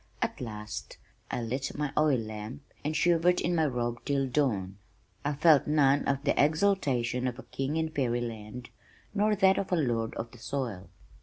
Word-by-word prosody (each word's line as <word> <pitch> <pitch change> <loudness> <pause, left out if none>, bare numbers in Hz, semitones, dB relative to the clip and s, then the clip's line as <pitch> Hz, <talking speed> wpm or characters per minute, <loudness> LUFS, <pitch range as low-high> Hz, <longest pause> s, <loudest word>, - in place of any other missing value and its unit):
At - - -2
last 105 -2 -6 0.3
I 120 - -2
lit 130 +5 -3
my 150 -2 -2
oil 150 -3 +4
lamp 110 +4 -6 0.2
and 155 +1 -1
shivered 175 +2 +3
in 175 - 0
my 160 -2 +3
robe 120 -2 -2
till 140 -1 0
dawn. 105 -9 0 0.4
I 145 - 0
felt 150 0 +5
none 145 -2 +3
of 140 0 0
the 140 - +2
exultation 145 -8 +1
of 120 -1 -3
a 135 - -9
"king 135 +4 -3
in 160 0 0
fairyland" 120 -4 -3 0.4
nor 210 +1 +2
that 190 -1 +4
of 195 - -4
a - - +4
"lord 120 -8 0
of 115 0 -5
the 120 - -14
soil." 115 -7 -4
135 Hz, 175 wpm, -29 LUFS, 120-155 Hz, 0.4 s, felt